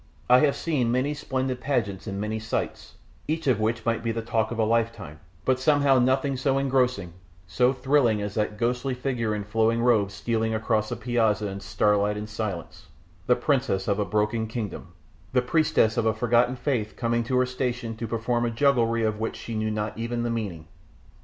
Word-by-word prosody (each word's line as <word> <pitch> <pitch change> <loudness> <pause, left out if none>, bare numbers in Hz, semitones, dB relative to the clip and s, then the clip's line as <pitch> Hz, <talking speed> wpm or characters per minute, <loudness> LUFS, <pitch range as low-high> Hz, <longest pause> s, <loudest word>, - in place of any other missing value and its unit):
I 125 - +8
have 145 -1 +3
seen 135 -8 0
many 130 +4 +1
splendid 130 -3 -3
pageants 115 -9 -1
and 100 -1 -4
many 110 +1 -2
sights, 110 0 -4 0.3
each 160 +1 -2
of 125 -6 +2
which 110 +2 -1
might 115 -1 0
be 115 - 0
the 115 0 -3
talk 110 -1 0
of 120 - -5
a 115 - +2
lifetime, 110 -8 -1 0.3
but 130 -1 +2
somehow 140 -1 +4
nothing 130 +3 +2
ever 130 - -4
so 135 0 +1
engrossing, 125 -9 0 0.3
so 90 +9 +2
thrilling, 130 -4 +2
as 105 0 -4
that 105 0 -1
ghostly 125 +3 -1
figure 125 -4 -1
in 105 - -3
flowing 115 +2 +1
robes 110 -5 +2
stealing 115 -1 -1
across 110 -1 0
the 120 - -2
piazza 110 -3 +1
in 100 0 -6
starlight 105 +1 +1
and 105 0 -6
silence 105 -5 -5 0.4
the 125 - +5
princess 125 -7 0
of 100 0 +1
a - - +2
broken 105 +3 0
kingdom, 110 -4 -5 0.5
the 125 - +4
priestess 140 -6 +2
of 115 - +2
a 110 - +2
forgotten 120 +2 +2
faith 120 -5 -2
coming 115 -1 0
to 125 +2 0
her 125 - +4
station 125 -2 -3
to 115 - -4
perform 120 +2 -1
a 120 - +1
jugglery 115 -2 +2
of 110 -1 0
which 110 - -2
she 115 - -7
knew 110 0 -1
not 105 0 -3
even 120 +1 -2
the 120 - -1
meaning. 100 -9 -4
115 Hz, 200 wpm, -26 LUFS, 110-125 Hz, 0.5 s, I